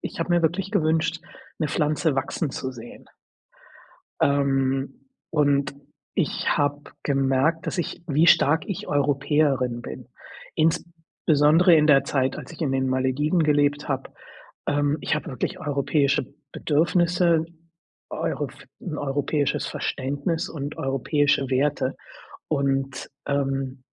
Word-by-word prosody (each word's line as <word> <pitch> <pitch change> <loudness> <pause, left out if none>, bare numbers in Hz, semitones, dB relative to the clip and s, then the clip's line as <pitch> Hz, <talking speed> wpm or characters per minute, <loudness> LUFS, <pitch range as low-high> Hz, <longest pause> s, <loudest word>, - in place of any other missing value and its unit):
ich - - -6
habe 165 - -2
mir 175 -1 +3
wirklich 180 +4 0
gewünscht 160 0 +1 0.4
'ne 155 -3 -1
Pflanze 150 -1 0
wachsen 135 +3 -2
zu 130 0 -4
sehen 120 -1 -11 1.2
ähm, 135 -1 +1 0.3
und 140 -2 +2 0.4
ich - - -1
habe 145 0 +1 0.2
gemerkt, 135 +3 +1
dass - - -3
ich 175 - -3
wie 155 +2 +3
stark 160 -1 +5
ich 195 - -4
Europäerin 140 -3 +1
bin, 65 - -9 0.5
insbesondere 160 0 +3
in 150 -1 +4
der 140 -3 +5
Zeit, 130 -1 0
als - - -9
ich 165 - -12
in 140 -4 0
den 130 0 0
Malediven 130 +6 +1
gelebt 145 -1 +2
habe. 135 -1 -3 0.6
Ähm, 145 +1 +1
ich - - 0
habe 150 - -4
wirklich 180 +8 -3
europäische 145 -2 +1 0.3
Bedürfnisse, 170 +1 +2 0.6
Euro - - -2
f - - -15
europäisches 145 -2 -1
Verständnis 140 +5 -2
und 145 -1 -6
europäische 135 +1 +1
Werte 135 0 0 0.5
und, 135 -2 -1 0.2
ähm 135 -2 -1
145 Hz, 120 wpm, -24 LUFS, 135-160 Hz, 1.2 s, stark